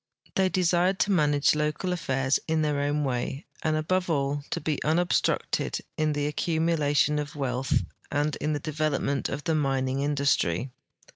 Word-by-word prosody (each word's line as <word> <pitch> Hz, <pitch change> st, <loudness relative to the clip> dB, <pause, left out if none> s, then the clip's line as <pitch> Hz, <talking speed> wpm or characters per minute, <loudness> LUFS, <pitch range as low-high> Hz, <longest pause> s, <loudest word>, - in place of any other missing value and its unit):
The}^ 190 Hz, -1 st, +2 dB
desired 180 Hz, +1 st, +2 dB
to 205 Hz, -, +2 dB
manage 145 Hz, -5 st, +3 dB
local 150 Hz, +4 st, -1 dB
affairs 135 Hz, -5 st, 0 dB
in 160 Hz, -1 st, +1 dB
their 150 Hz, -1 st, 0 dB
own 145 Hz, +1 st, 0 dB
way, 135 Hz, +2 st, -2 dB, 0.2 s
and 155 Hz, -1 st, +1 dB
above 180 Hz, +4 st, 0 dB
all 140 Hz, -2 st, 0 dB
to -, -, -2 dB
be 150 Hz, -1 st, -2 dB
unobstructed 170 Hz, +3 st, +1 dB, 0.2 s
in 155 Hz, -1 st, +1 dB
the 145 Hz, 0 st, -1 dB
accumulation 150 Hz, -1 st, +1 dB
of 145 Hz, 0 st, -5 dB
wealth 130 Hz, -2 st, 0 dB, 0.3 s
and 145 Hz, +1 st, 0 dB
in 150 Hz, +1 st, -1 dB
the 145 Hz, -, -1 dB
develoi)ment 150 Hz, -2 st, -1 dB
of 140 Hz, +2 st, -4 dB
the 165 Hz, -, 0 dB
mining 135 Hz, -3 st, 0 dB
industrv. 140 Hz, -, +1 dB
150 Hz, 155 wpm, -27 LUFS, 140-160 Hz, 0.3 s, manage